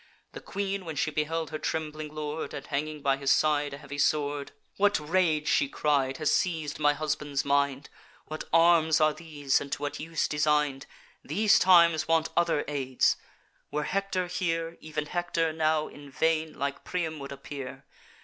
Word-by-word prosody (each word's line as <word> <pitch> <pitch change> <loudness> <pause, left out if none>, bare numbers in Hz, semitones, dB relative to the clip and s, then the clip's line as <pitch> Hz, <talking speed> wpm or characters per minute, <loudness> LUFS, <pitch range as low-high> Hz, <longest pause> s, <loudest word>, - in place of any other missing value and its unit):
The - - -9
Queen, 200 -1 -3
when 160 -3 -6
she 155 +2 0
beheld 155 +1 -2
her 155 - -4
trembling 155 -1 -3
lord, 155 +1 -4
And 140 - -7
hanging 150 +1 -3
by 135 -1 +2
his 140 0 -2
side 145 0 +2
a - - -10
heavy 145 0 -8
sword, 145 -1 0 0.3
'What 205 -1 +3
rage,' 155 -1 +1
she 140 - +2
cried, 140 -3 +1
'has 155 - +1
seiz'd 160 -5 0
my 145 -1 +4
husband's 145 -2 -2
mind? 140 -1 +1 0.4
What 155 0 -6
arms 165 -1 +5
are 155 -1 +4
these, 150 -5 -1
and 140 - -7
to - - -4
what 145 - -3
use 165 +1 -1
design'd? 150 -2 +1 0.4
These 210 +7 +3
times 170 -4 +5
want 165 -1 +2
other 170 -3 +2
aids! 135 -3 +1 0.5
Were 150 +1 -2
Hector 195 +1 -1
here, 165 -2 -2
Ev'n 155 -1 -3
Hector 165 -1 -1
now 155 -1 +1
in 145 -1 -12
vain, 160 +2 0
like 140 0 -3
Priam, 160 -4 -3
would 140 0 -7
appear. 140 -1 -8
155 Hz, 170 wpm, -28 LUFS, 145-165 Hz, 0.5 s, arms